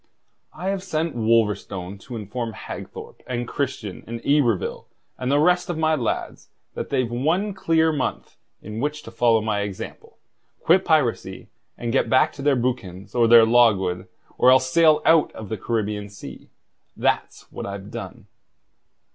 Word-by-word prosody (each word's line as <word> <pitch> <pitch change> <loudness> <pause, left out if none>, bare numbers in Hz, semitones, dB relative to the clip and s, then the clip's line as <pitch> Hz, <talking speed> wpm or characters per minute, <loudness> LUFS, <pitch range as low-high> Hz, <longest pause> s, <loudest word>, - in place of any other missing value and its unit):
"I 185 - -4
have 195 -1 -2
sent 165 -5 -2
Wolverstone 105 -4 0
to 120 +5 -9
inform 115 +2 -5
Hagthorpe - - -9
and 120 -1 -3
Christian 130 -9 -4
and 115 +1 -5
Yberville 130 -9 +1 0.3
and 125 +1 -1
the 145 - +4
rest 180 +4 +3
of 175 - -2
my 160 0 +2
lads 125 -7 -3 0.2
that - - -5
they've 130 -4 0
one 165 +12 0
clear 165 -3 +2
month 140 -4 -3 0.3
in 105 +2 -6
which 150 +3 -2
to 115 - -10
follow 115 -1 +3
my 105 -1 -1
example, 100 -2 -7 0.5
quit 185 +3 +4
piracy, 150 -8 0 0.3
and 120 -1 -3
get 135 - +2
back 130 - +3
to 140 - -9
their 140 0 +3
boucans 100 -6 -3
or 120 -2 +3
their 115 -1 +8
logwood, 100 -6 +3 0.3
or 125 - +6
else 130 0 +4
sail 160 0 +4
out 165 -2 +4
of 110 -2 -9
the 110 - -3
Caribbean 105 -2 -2
Sea. 100 - -11 0.5
That's - - -1
what - - -6
I've 100 +1 -7
done." - - -8
120 Hz, 160 wpm, -23 LUFS, 105-150 Hz, 0.5 s, their